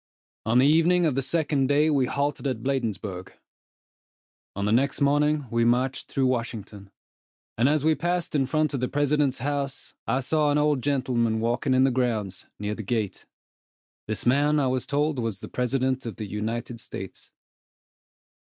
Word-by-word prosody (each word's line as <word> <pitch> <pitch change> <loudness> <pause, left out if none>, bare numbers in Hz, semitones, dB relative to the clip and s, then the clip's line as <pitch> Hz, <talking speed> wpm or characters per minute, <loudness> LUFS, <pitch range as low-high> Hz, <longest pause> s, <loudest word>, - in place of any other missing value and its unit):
On 115 +2 +3
the 130 - +5
evening 165 +4 +4
of 155 - +2
the 135 - 0
second 145 -1 0
day, 145 +2 +3
we 135 -4 +2
halted 140 +1 -1
at 125 -4 -3
Bladensburg. 110 -8 -3 1.2
On 100 +1 -2
the 105 - +1
next 135 +4 +2
morning, 145 +1 +2
we 115 0 +2
marched 125 +3 +1
through 135 - 0
Washington, 110 -5 -3 0.7
and 120 +4 +3
as 150 -1 +1
we 160 +1 +4
passed 175 +2 -2
in 135 -3 +1
front 155 +1 0
of 135 - -1
the 125 - 0
President's 145 -1 +1
house, 140 +1 -3
I 130 - +1
saw 150 +3 +1
an 145 - +2
old 150 -2 +2
gentleman 120 -5 0
walking 120 +3 0
in 130 - +4
the 135 - +3
grounds, 110 -7 -2
near 105 0 -3
the 110 - -6
gate. 110 -1 -3 0.8
This 110 - -3
man 145 +4 +3
I 140 - +2
was 130 -1 -1
told 145 -1 0
was 115 -5 -2
the - - -8
President 130 0 -1
of 115 - -5
the 110 - -5
United 110 +3 -4
States. 95 -4 -9
130 Hz, 170 wpm, -26 LUFS, 115-145 Hz, 1.2 s, the